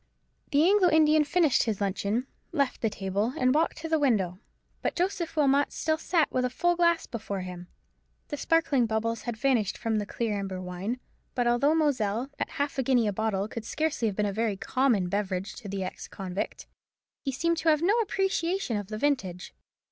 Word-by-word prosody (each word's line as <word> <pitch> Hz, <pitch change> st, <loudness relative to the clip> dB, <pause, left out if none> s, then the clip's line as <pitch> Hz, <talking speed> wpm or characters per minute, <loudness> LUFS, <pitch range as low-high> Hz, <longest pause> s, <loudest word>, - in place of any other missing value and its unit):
The 295 Hz, +4 st, +4 dB
Anglo 390 Hz, -2 st, +5 dB
Indian 310 Hz, -1 st, +5 dB
finished 310 Hz, -1 st, +3 dB
his 220 Hz, -4 st, -1 dB
luncheon, 200 Hz, +4 st, -1 dB, 0.3 s
left 280 Hz, -6 st, 0 dB
the 225 Hz, -, +2 dB
table, 200 Hz, +4 st, -2 dB
and 255 Hz, 0 st, +3 dB
walked 315 Hz, +3 st, +1 dB
to 325 Hz, -, -5 dB
the 320 Hz, -1 st, +2 dB
window: 195 Hz, -10 st, +1 dB, 0.4 s
but -, -, -1 dB
Joseph 350 Hz, -2 st, -1 dB
Wilmot 285 Hz, -1 st, +3 dB
still 315 Hz, 0 st, -1 dB
sat 330 Hz, -2 st, +1 dB
with 255 Hz, -, 0 dB
a 250 Hz, -, +1 dB
full 350 Hz, +7 st, +1 dB
glass 340 Hz, -1 st, +3 dB
before 205 Hz, -4 st, -5 dB
him. 180 Hz, -1 st, -7 dB, 0.6 s
The 290 Hz, -, -3 dB
sparkling 285 Hz, -7 st, +2 dB
bubbles 225 Hz, +1 st, -1 dB
had 230 Hz, -, -4 dB
vanished 240 Hz, -5 st, +1 dB
from 225 Hz, -2 st, 0 dB
the 205 Hz, -, -4 dB
clear 215 Hz, -3 st, -2 dB
amber 195 Hz, -2 st, -4 dB
wine; 185 Hz, +7 st, -4 dB, 0.4 s
but 245 Hz, -, +1 dB
although 240 Hz, +6 st, +3 dB
Moselle 255 Hz, -5 st, 0 dB
at -, -, -1 dB
half 285 Hz, -1 st, -2 dB
a -, -, +4 dB
guinea 250 Hz, -2 st, +3 dB
a 205 Hz, -, 0 dB
bottle 205 Hz, -1 st, -1 dB
could 225 Hz, 0 st, -6 dB
scarcely 295 Hz, -1 st, -1 dB
have 205 Hz, -, -2 dB
been 210 Hz, -, +2 dB
a 200 Hz, -, -1 dB
very 220 Hz, -1 st, 0 dB
common 240 Hz, -6 st, +1 dB
beverage 195 Hz, 0 st, -2 dB
to 215 Hz, -5 st, -8 dB
the 195 Hz, 0 st, -3 dB
ex 185 Hz, -, -6 dB
convict, 190 Hz, 0 st, -5 dB, 0.6 s
he 275 Hz, -, -1 dB
seemed 335 Hz, +6 st, 0 dB
to 325 Hz, -, +2 dB
have 305 Hz, 0 st, +3 dB
no 385 Hz, +4 st, +4 dB
appreciation 385 Hz, -, 0 dB
of 205 Hz, -2 st, -5 dB
the 215 Hz, +1 st, -5 dB
vintage. 215 Hz, -10 st, -1 dB
245 Hz, 195 wpm, -28 LUFS, 205-310 Hz, 0.6 s, Anglo